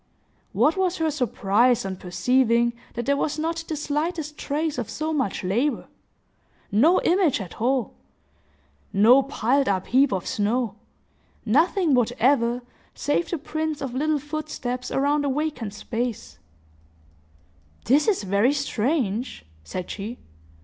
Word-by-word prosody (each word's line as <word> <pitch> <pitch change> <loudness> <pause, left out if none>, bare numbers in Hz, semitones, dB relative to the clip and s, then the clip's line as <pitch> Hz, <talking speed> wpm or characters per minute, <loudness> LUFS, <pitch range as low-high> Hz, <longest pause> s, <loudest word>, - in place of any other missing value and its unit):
What 320 +5 +2
was 370 -1 +1
her 320 -1 0
surprise, 240 -3 +2
on 190 -1 -3
perceiving 235 +6 +2 0.2
that 240 -1 -3
there 280 - +2
was 290 +1 -1
not 330 +1 -2
the 315 - -3
slightest 300 +1 -2
trace 300 0 -2
of 235 - -4
so 315 +1 -3
much 265 -12 -1
labor!—no 235 +11 0 1.1
image 350 -7 +2
at 195 +1 -8
all!—no 255 +1 +1 1.3
piled 270 0 +1
up 190 -2 0
heap 265 +3 +3
of 190 -3 -2
snow!—nothing 240 - -1
whatever, 245 0 +2 0.3
save 290 +4 0
the 345 - -1
prints 315 0 -3
of 270 -4 -4
little 305 +3 +1
footsteps 285 -4 -4
around 290 +2 +1
a 285 - 0
vacant 290 -7 -2
space! 225 - -4 1.5
"This 285 +5 +3
is 400 - +2
very 200 +7 +2
strange!" 250 - -1 0.2
said 180 - -5
she. 215 +4 -6
265 Hz, 120 wpm, -24 LUFS, 230-305 Hz, 1.5 s, heap